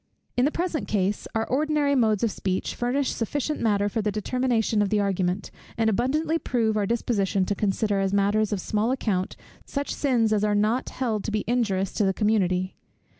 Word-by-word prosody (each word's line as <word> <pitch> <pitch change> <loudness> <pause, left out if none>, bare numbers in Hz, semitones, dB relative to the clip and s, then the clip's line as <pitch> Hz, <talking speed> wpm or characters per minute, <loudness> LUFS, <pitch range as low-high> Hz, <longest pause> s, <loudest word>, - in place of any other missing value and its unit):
In 245 - +3
the 295 - +2
present 340 -2 -2
case, 200 0 -1
our 225 0 +1
ordinary 295 +1 +1
modes 220 -6 +2
of 230 - +2
speech 185 -1 -2
furnish 255 +3 0
sufficient 290 +6 -2
matter 205 -3 +2
for 215 +2 -1
the 210 0 0
determination 225 0 0
of 205 - +1
the 210 - +2
argument; 190 -1 -1 0.3
and 225 -1 +2
abundantly 305 +9 0
prove 225 -6 0
our 205 -2 +1
disposition 200 -4 0
to 205 - 0
consider 205 0 0
as 195 0 0
matters 205 +2 +2
of 205 - -1
small 215 +4 0
account, 210 -8 -1 0.3
such 280 0 -3
sins 235 -6 +2
as 210 -1 +1
are 210 -1 +2
not 215 +5 +1
held 225 -5 -2
to 220 - -2
be 215 -1 -1
injurious 200 -5 0
to - - +1
the 190 -1 +1
community. 185 -4 +1
215 Hz, 190 wpm, -25 LUFS, 200-245 Hz, 0.3 s, In